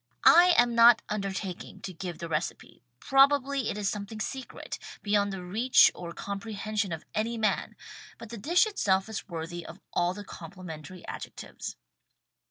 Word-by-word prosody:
I 355 +1 +8
am 240 0 +4
not 235 0 +7
undertaking 195 -3 -4
to 185 - -6
give 175 -1 -6
the 170 - -6
recipe. 160 +1 -4 0.2
Probably 275 -1 +3
it - - -3
is 205 -1 -1
something 210 +2 -4
secret 260 +2 -6
— - - -14
beyond 205 -1 +2
the 190 -2 -6
reach 225 +8 +5
or 170 -1 -7
comprehension 200 +1 -3
of 160 -1 -5
any 230 +2 -1
man, 215 -3 0 0.4
but 230 - -10
the 235 - -6
dish 345 - +4
itself 195 - +1
is 220 -1 -6
worthy 170 +1 -5
of 165 +3 -11
all 175 +1 +1
the 205 0 -8
compli 180 +1 -10
mentary 160 +2 -9
adjectives. - - -7
205 Hz, 165 wpm, -28 LUFS, 180-235 Hz, 0.4 s, I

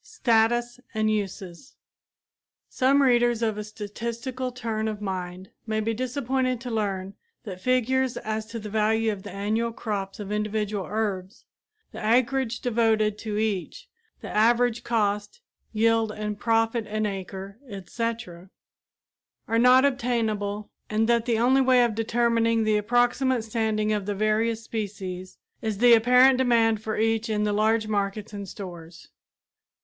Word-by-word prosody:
STATUS 240 - +1 0.2
AND 215 0 +1
USES 195 +1 -5 0.9
Some 275 +2 +3
readers 240 -2 +3
of 220 -2 0
a - - -3
statistical 235 +5 -5
turn 225 -3 -3
of 215 -1 -4
mind 185 -2 -5 0.2
may 215 0 0
be 225 +1 -1
disappointed 255 +1 -1
to 245 -1 -5
learn 195 -3 -2 0.3
that 185 -5 -8
figures 255 +1 +1
as 215 0 -4
to 230 +1 -6
the 210 -2 -7
value 220 +1 +2
of 200 -2 -6
the - - -9
annual 215 +4 -1
crops 200 -4 -4
of 205 -1 -6
individual 210 -2 -2
herbs, 205 -1 -3 0.5
the - - -8
acreage 245 +2 +1
devoted 220 -3 +1
to 215 -2 -4
each, 220 - -2 0.3
the - - -7
average 235 +2 +2
cost, 210 - -1 0.3
yield 225 0 +2
and 210 -1 -5
profit 225 -1 +1
an 215 +1 -1
acre, 195 +1 -6
etc., 200 -2 -5 1.0
are 230 0 +1
not 250 +2 +6
obtainable 220 -6 -1 0.2
and 220 +1 +1
that 235 0 +2
the 230 -2 +2
only 255 +4 +4
way 255 -1 +5
of 235 -2 +1
determining 230 0 +1
the 215 0 +2
approximate 245 +3 +1
standing 220 -1 0
of 205 -2 -2
the 205 - -1
various 220 +2 0
species 190 -4 -6 0.2
is 220 -3 -2
the 240 +2 +6
apparent 250 +3 +6
demand 230 -4 +3
for 220 -1 -3
each 225 +1 +1
in 210 -1 0
the 210 -1 0
large 215 +1 +2
markets 205 0 -2
and 200 -2 -6
stores. 175 -4 -10
220 Hz, 145 wpm, -25 LUFS, 210-240 Hz, 1.0 s, not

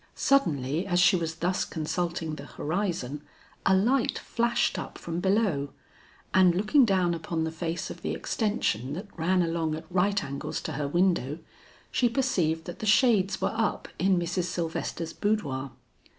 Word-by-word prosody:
Suddenly 165 - +1
as 175 -2 +2
she 180 +2 +6
was 165 -2 -2
thus 180 +2 0
consulting 165 0 -2
the 145 -2 -7
horizon, 155 -5 -2 0.5
a 190 - +6
light 240 +7 +2
flashed 235 0 0
up - - -7
from 170 0 -4
below, 190 -8 +1 0.6
and 185 -2 +5
looking 215 +8 +4
down 185 -4 +2
upon 165 0 -2
the 160 - -2
face 165 +1 -3
of - - -9
the - - -2
extension 145 - -1
that 200 +5 -7
ran 180 +2 +2
along 165 -2 -1
at 160 - -8
right 195 +2 +2
angles 140 0 -4
to - - -4
her 145 -1 -2
window, 170 -3 +1 0.5
she 245 - +2
perceived 180 - 0
that 175 - -7
the 215 - -3
shades 210 -3 +4
were - - 0
up 225 -1 -1
in 190 0 +3
Mrs. 175 +1 -1
Sylvester's 165 -1 -3
boudoir. 140 -11 -1
175 Hz, 160 wpm, -28 LUFS, 160-200 Hz, 0.6 s, she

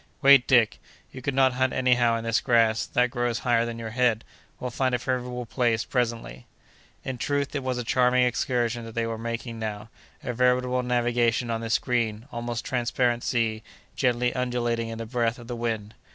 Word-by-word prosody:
"Wait, 140 -2 +7
Dick; 120 -5 +4 0.3
you 130 - -9
could 135 +1 -2
not 130 -1 +4
hunt 130 +1 0
anyhow 125 -2 +3
in 115 - -5
this 115 +5 +1
grass, 115 -4 +2
that 125 0 +1
grows 120 -1 -1
higher 120 -1 +1
than 115 -1 -5
your 115 -1 -6
head. 115 -2 +1 0.4
We'll 125 - -4
find 130 +1 0
a - - +1
favorable 125 0 -3
place 115 -2 0
presently." 115 - -3 0.6
In 130 -2 -5
truth, 140 +2 -1
it 145 - -2
was 130 -1 -2
a 125 - -2
charming 125 +1 +3
excursion 120 -1 0
that 115 - -10
they 115 -1 0
were 115 -1 -4
making 115 0 -5
now—a 110 +5 -7
veritable 125 +1 +2
navigation 120 -1 +1
on 115 0 -2
this 115 0 +1
green, 115 -3 -1
almost 120 -1 -4
transparent 120 -1 0
sea, 110 -3 0 0.3
gently 125 -1 +1
undulating 120 -2 -1
in 115 - -6
the 115 - -5
breath 115 0 -1
of 120 - -11
the 120 +1 -5
wind. 110 -3 -3
120 Hz, 185 wpm, -26 LUFS, 115-125 Hz, 0.6 s, Wait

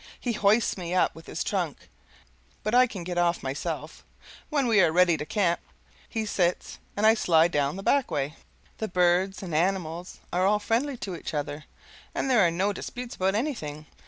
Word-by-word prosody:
He 240 - -2
hoists 210 0 +2
me 175 0 -3
up 185 - +3
with 165 0 -14
his - - -3
trunk, - - -3 0.8
but 215 - -1
I 250 +1 +6
can 195 -7 -7
get 175 0 -2
off 175 0 +1
myself; 135 +2 -4 0.5
when 285 -4 +1
we 220 -4 +5
are 170 -3 +4
ready 175 0 +4
to 150 -1 -5
camp, 175 -3 +1 0.5
he 220 -2 -2
sits 180 -4 -1 0.2
and 210 - +2
I 220 - +8
slide 170 -6 +3
down 145 0 0
the 195 - -6
back 280 +3 +2
way. 145 0 -2 0.5
The 220 - -1
birds 180 +1 +2
and 175 -4 -6
animals 175 0 -1 0.2
are 185 +2 +3
all 210 +1 +4
friendly 240 +6 -1
to 190 -5 -5
each 165 - -6
other, 145 +1 -4 0.5
and 270 - 0
there 240 -4 +5
are 170 - +4
no 190 +5 0
disputes 245 +5 -6
about 190 +1 +1
anything. 160 - -3
185 Hz, 190 wpm, -27 LUFS, 170-215 Hz, 0.8 s, I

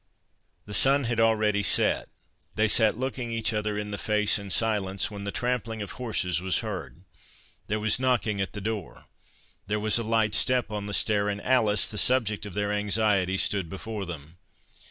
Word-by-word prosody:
The 105 - -8
sun 140 +6 +3
had 115 -1 -1
already 110 -2 +3
set—they 110 +1 -1
sat 110 0 +3
looking 125 -2 -3
each 115 0 0
other 105 -1 -1
in 105 0 -4
the 100 - -4
face 105 +2 +2
in 100 -1 -8
silence, 100 -1 0
when 100 -1 -7
the 100 - -2
trampling 115 -3 -2
of 100 - -7
horses 95 -8 -1
was 95 -2 0
heard—there 95 0 -7
was 110 +3 +1
knocking 115 -6 +1
at 95 - -3
the 105 - -6
door—there 105 0 -6
was 110 +2 +2
a - - -1
light 110 -1 +1
step 125 0 +1
on 105 -1 -4
the 105 - -2
stair, 105 -1 +1
and 100 0 -2
Alice, 110 -6 +3
the 105 - -3
subject 110 -5 +1
of 100 - -7
their 105 0 0
anxiety, 105 -2 +2
stood 95 -3 0
before 100 +1 -5
them. 80 0 -9
105 Hz, 175 wpm, -27 LUFS, 100-110 Hz, -, sun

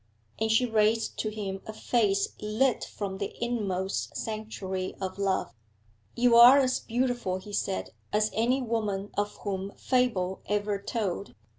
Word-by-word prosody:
And 220 0 +1
she 220 +3 +4
raised 220 -1 +1
to 215 - 0
him 200 -3 -5
a 220 - -5
face 210 -3 +1
lit 220 +4 +1
from 195 -2 -5
the 200 - -4
inmost 200 -6 -2
sanctuary 205 -4 -4
of 190 0 -4
love. 195 -10 0 0.6
'You 240 0 +4
are 245 +3 +10
as 260 -2 +2
beautiful,' 240 -5 -1
he 205 +2 -10
said, 95 - -2 0.2
'as 215 +1 +2
any 245 +6 +1
woman 210 -4 -2
of 205 0 -1
whom 195 -1 -3
fable 225 -8 +1
ever 205 -1 0
told. 200 -3 -3
210 Hz, 145 wpm, -28 LUFS, 195-235 Hz, 0.6 s, are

